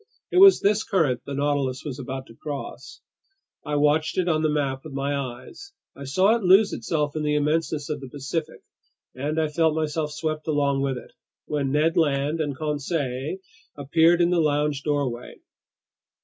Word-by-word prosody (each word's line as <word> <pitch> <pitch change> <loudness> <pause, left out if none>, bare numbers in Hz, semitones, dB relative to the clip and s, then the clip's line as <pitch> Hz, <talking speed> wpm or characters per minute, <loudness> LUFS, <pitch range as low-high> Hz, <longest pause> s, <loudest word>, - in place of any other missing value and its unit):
It - - 0
was 390 0 +8
this 210 +2 +2
current 155 - +1
the 140 - -4
Nautilus 140 -2 -1
was 140 -2 -5
about 130 0 -5
to 115 - -15
cross. 140 +3 -7 0.6
I 150 - -3
watched 150 +1 +2
it 180 -1 +1
on 155 -2 +2
the 155 - +2
map 140 -3 -1
with 155 - -9
my 140 +1 -1
eyes, 140 - -7 0.2
I 140 - -9
saw 185 - +3
it 235 - -2
lose 195 +2 +5
itself 150 -2 -2
in 155 - -2
the 150 0 0
immenseness 150 0 0
of 150 -2 -4
the 135 - -8
Pacific, 150 +4 -5 0.5
and 145 +5 -2
I 160 - +1
felt 160 +1 +1
myself 155 -1 -2
swept 155 0 -4
along 140 -3 +1
with 135 -2 -1
it, - - -11 0.3
when 140 -3 -2
Ned 155 +3 +2
Land 150 0 +1
and 145 -3 -2
Conseil 145 0 -2 0.4
appeared 165 +5 +3
in 170 +1 +3
the 175 -2 +3
lounge 150 -1 0
doorway. 140 -5 -2
150 Hz, 175 wpm, -24 LUFS, 140-160 Hz, 0.6 s, was